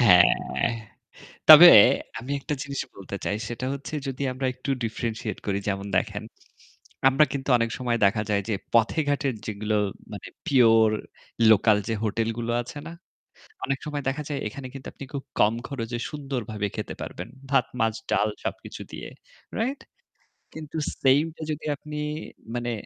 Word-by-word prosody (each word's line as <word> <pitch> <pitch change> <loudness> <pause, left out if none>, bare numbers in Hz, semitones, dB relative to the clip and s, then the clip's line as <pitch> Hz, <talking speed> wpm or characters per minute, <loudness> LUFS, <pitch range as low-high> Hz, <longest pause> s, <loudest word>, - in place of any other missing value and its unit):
হ্যাঁ। 90 -7 +4 0.8
তবে 155 +3 +12 0.5
আমি 125 +5 -5
একটা 150 +2 -3
জিনিস 140 -1 -4 0.2
বলতে 100 0 -7
চাই 100 - -1
সেটা 120 +2 -4
হচ্ছে 140 +2 -7
যদি 135 +1 -4
আমরা 130 +1 -3
একটু 130 +2 -6
differentiate 110 -2 -4
করি। 100 -1 0
যেমন 100 0 -2
দেখেন, - - -1 0.9
আমরা 135 +3 +5
কিন্তু 135 -1 -4
অনেক 115 0 0
সময় 120 -2 0
দেখা 105 +2 +1
যায় 100 -1 +1
যে 110 - +1 0.2
পথে-ঘাটের 140 +2 +2
যেগুলো 105 0 -2 0.4
মানে - - -8 0.2
pure 115 -5 +5 0.5
লোকাল 105 0 +5
যে 115 - 0
হোটেলগুলো 115 +2 -1
আছে 120 +4 -9
না? - - -8 0.7
অনেক 135 0 -1
সময় 145 -1 -4
দেখা 150 +3 -3
যায় 145 -2 -2
এখানে 130 +4 -7
কিন্তু 135 -1 -9
আপনি 140 - -9
খুব 140 - -4 0.2
কম 105 +2 +5
খরচে 120 -3 -4
সুন্দর 140 -4 -4
ভাবে 105 -1 -2
খেতে - - -4
পারবেন। - - -6 0.2
ভাত, 140 - +4
মাছ, 115 -1 +1 0.2
ডাল 105 - +2 0.2
সবকিছু - - -5
দিয়ে। - - -7 0.5
রাইট? 265 +5 -1 0.7
কিন্তু 160 0 -7 0.2
সেইমটা 150 +5 +2
যদি 155 - -5
আপনি 150 +1 -8 0.6
মানে, 120 0 -2
125 Hz, 150 wpm, -25 LUFS, 110-140 Hz, 0.9 s, তবে